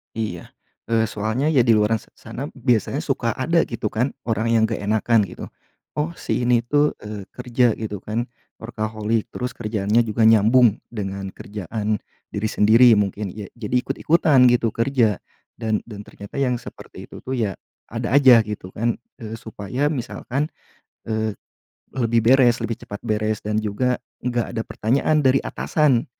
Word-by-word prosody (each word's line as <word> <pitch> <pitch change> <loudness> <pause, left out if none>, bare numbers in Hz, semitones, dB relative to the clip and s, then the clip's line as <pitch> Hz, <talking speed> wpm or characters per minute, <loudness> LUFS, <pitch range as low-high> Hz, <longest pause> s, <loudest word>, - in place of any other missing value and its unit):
Iya, 105 -7 -4 0.4
eee, 115 -1 +2
soalnya 110 +8 -1
ya 135 -5 +5
di 115 - +6
luaran 105 +1 +2
sa - - -19
sana 125 +5 -7
biasanya 125 -5 0
suka - - -1
ada - - +2
gitu - - -3
kan 125 +5 -1
orang 110 0 -1
yang 110 -1 +4
keenakan 110 +1 +1
gitu, 90 - -9 0.5
oh 155 +3 -1
si 120 - -2
ini 120 -1 +3
tuh, 145 +4 +2
eee, 105 -2 -7
kerja 125 -2 +1
gitu 105 -3 -5
kan 110 +4 -2 0.4
workaholic, 110 -1 -2
terus 125 0 -3
kerjaannya 105 0 +1
juga 110 +1 +1
nyambung 110 +1 +5
dengan 95 -3 -5
kerjaan 105 +1 -3 0.3
diri 105 +1 -1
sendiri 115 +4 +5
mungkin, 100 0 -1
ya 105 -3 -7
jadi 115 +1 -3
ikut-ikutan 140 -2 +4
gitu 120 -2 +2
kerja 115 -4 +1 0.4
dan 110 -2 0
dan 105 -2 -7
ternyata 100 +5 -11
yang 125 -3 +2
seperti - - -11
itu - - -10
tuh 130 - -5
ya 110 -5 -1 0.4
ada - - -3
aja 130 -5 +8
gitu 105 -3 -6
kan. 115 +1 -1 0.2
Eee, 110 0 -6
supaya 110 +7 -3
misalkan, 140 +1 -3 0.6
eee, 110 -1 -1 0.6
lebih 115 -3 +1
beres 125 -1 +5
lebih 115 -1 -3
cepat 100 - -6
beres, 110 -1 -1
dan 105 0 0
juga 120 +4 -1 0.2
nggak 120 -2 0
ada 115 - 0
pertanyaan 140 +7 +1
dari 135 -1 +3
atasan, 140 -7 +1
115 Hz, 155 wpm, -22 LUFS, 105-125 Hz, 0.6 s, aja